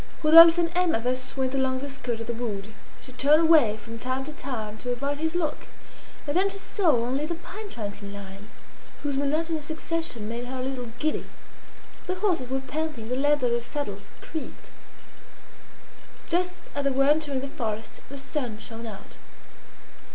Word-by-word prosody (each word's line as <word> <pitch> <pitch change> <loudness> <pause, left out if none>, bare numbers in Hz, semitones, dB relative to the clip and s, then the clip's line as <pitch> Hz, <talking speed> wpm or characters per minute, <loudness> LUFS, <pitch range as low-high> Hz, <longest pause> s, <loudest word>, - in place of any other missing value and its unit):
Rodolphe 330 +2 +10
and 335 -1 +2
Emma 355 -9 +3
thus 255 +3 -2
went 260 0 0
along 265 -1 +1
the 280 +2 -5
skirt 250 -4 -3
of 230 - -4
the 235 - -2
wood. 215 -4 -4 0.3
She 260 - -11
turned 290 +5 +5
away 300 -10 +6
from 230 +2 -9
time 255 +2 -2
to 305 - -6
time 220 -7 -5
to 250 - -5
avoid 280 +4 -2
his 320 +2 -1
look, 315 -4 -1 0.6
and 290 0 -2
then 385 +2 +4
she 395 - -5
saw 390 -1 -2 0.2
only 270 +5 -1
the 340 - -2
pine 400 +5 -8
trunks 205 - -5
in 200 -1 -7
lines, 200 +1 -10 0.5
whose 285 -2 0
monotonous 305 +3 0
succession 315 -7 -2
made 235 +2 -4
her 260 +1 -5
a - - -2
little 255 -2 -3
giddy. 305 +4 -1 0.8
The 370 - 0
horses 360 -10 0
were 265 0 0
panting; 270 -4 -4
the 250 - 0
leather 290 0 +3
of - - +1
the 235 - +1
saddles 285 +4 -5
creaked. 315 - -7 1.5
Just 360 +1 0 0.2
as 285 - -1
they 275 - +3
were 270 0 +3
entering 290 -2 +2
the 275 - -4
forest 220 -4 -4
the 280 - -7
sun 270 -5 -3
shone 225 +1 -7
out. 210 -3 -10
270 Hz, 180 wpm, -27 LUFS, 235-315 Hz, 1.5 s, Rodolphe